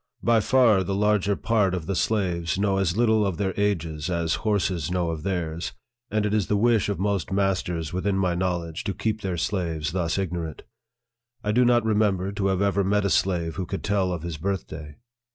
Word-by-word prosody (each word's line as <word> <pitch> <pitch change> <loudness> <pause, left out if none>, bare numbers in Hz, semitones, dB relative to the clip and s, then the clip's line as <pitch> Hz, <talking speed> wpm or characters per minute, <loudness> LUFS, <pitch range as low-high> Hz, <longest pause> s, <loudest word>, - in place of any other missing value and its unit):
By 115 -1 +4
far 110 -4 +4
the 95 +1 -2
larger 105 -1 +2
part 105 -3 +1
of 85 -4 -4
the 95 - -2
slaves 90 -6 0
know 100 -1 +1
as 95 0 0
little 110 -2 +3
of 95 -5 -1
their 95 0 -1
ages 85 -7 -1
as 85 -2 0
horses 95 -7 0
know 90 -2 0
of 80 -2 -5
theirs, 85 -3 -3 0.4
arid 110 -1 +1
it 105 - 0
is 105 -3 +1
the 105 - +1
wish 115 -1 +3
of 100 - -1
most 100 -2 -1
masters 90 -5 -1
within 95 +2 0
my 90 -2 +1
knowledge 85 -2 -2
to 100 - -2
keep 110 -1 -2
their 95 -3 -2
slaves 80 -4 -2
thus 85 -1 -1
ignorant. 85 -4 -3 0.8
I 105 - 0
do 125 +4 +4
not 120 -1 +3
remember 105 -3 +1
to 100 -1 -1
have 95 0 +1
ever 100 0 +2
met 100 +1 +1
a 100 - +1
slave 85 -2 0
who 95 -2 -3
could 95 - -4
tell 100 -3 +1
of 85 -3 -4
his 85 -2 -4
birthday. 80 -4 -4
95 Hz, 205 wpm, -25 LUFS, 85-105 Hz, 0.8 s, By